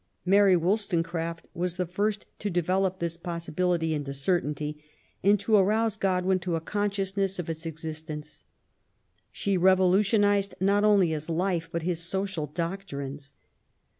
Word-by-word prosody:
Mary 195 0 +5
Wollstonecraft 170 -3 -1
was 175 0 -2
the 180 0 -1
first 205 +4 -1
to 205 - -2
develop 185 +1 +1
this 170 -2 -3
possibility 170 -1 -1
into 140 -2 -3
certainty, 150 -1 -1 0.4
and 200 +2 +4
to 215 +2 +2
arouse 215 +3 +3
Godwin 185 -2 +1
to 175 -2 -2
a - - 0
consciousness 195 +1 -1
of 165 -2 -3
its 160 +1 -6
existence. 155 -1 -7 0.9
She 200 -2 -1
revolutionized 195 +2 +3
not 200 +2 +3
only 205 -5 +5
his 155 0 -4
life, 170 -1 -1
but 170 -1 -2
his 175 -1 -1
social 185 -2 -2
doctrines. 145 -4 -5
180 Hz, 135 wpm, -27 LUFS, 165-195 Hz, 0.9 s, Mary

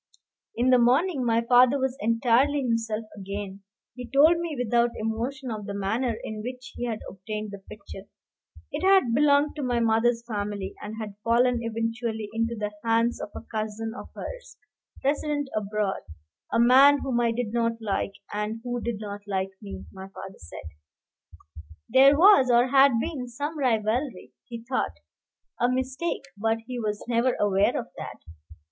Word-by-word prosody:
In 245 +2 +2
the 250 - +6
morning 265 +5 +3
my 230 -1 +2
father 250 +3 +5
was 265 -1 -1
entirely 240 +6 +2
himself 225 -2 -1
again. 200 0 -6 0.3
He 250 -1 -8
told 310 +5 +5
me 335 -4 -4
without 240 0 +2
emotion 240 +4 -3
of 215 -2 -5
the 200 - -4
manner 220 +4 -1
in 215 -1 -5
which 250 +2 -7
he 245 - -3
had 225 -3 -3
obtained 210 +2 -6
the 200 - -8
picture. 200 0 -11 0.6
It - - -3
had 380 -11 +4
belonged 290 +2 +3
to - - -3
my 245 -3 0
mother's 230 +1 +2
family, 205 -3 -4
and 210 +1 -6
had 210 -2 -6
fallen 240 +2 +3
eventually 225 -1 -3
into 230 +1 -1
the 210 -1 -3
hands 230 +1 +1
of - - -5
a - - -6
cousin 220 0 -4
of - - -9
hers, - - -8 0.5
resident 290 0 0
abroad, 210 -1 -1 0.5
"A 230 - +2
man 270 +4 +7
whom 250 -3 0
I 235 -1 +2
did 230 -1 -3
not 230 -1 +1
like, 200 -2 -2 0.2
and 210 +2 -3
who 245 -1 -3
did 235 0 -2
not 205 -1 -6
like 195 -1 -1
me," 200 -2 -8
my 190 0 -9
father 195 0 -10
said; 85 -3 -10 1.2
"there 270 +4 +6
was, 345 -7 +7
or 240 +1 +4
had 275 0 +6
been, 270 -2 -3
some 285 +6 -4
rivalry, 245 0 -1
he 235 -1 -8
thought: 260 - -1 0.6
a 245 - +3
mistake, 260 +6 -2
but 225 +2 0
he 250 0 -5
was 210 -2 -3
never 245 +1 +2
aware 200 -1 +2
of - - -5
that. - - -7
235 Hz, 165 wpm, -26 LUFS, 215-255 Hz, 1.2 s, man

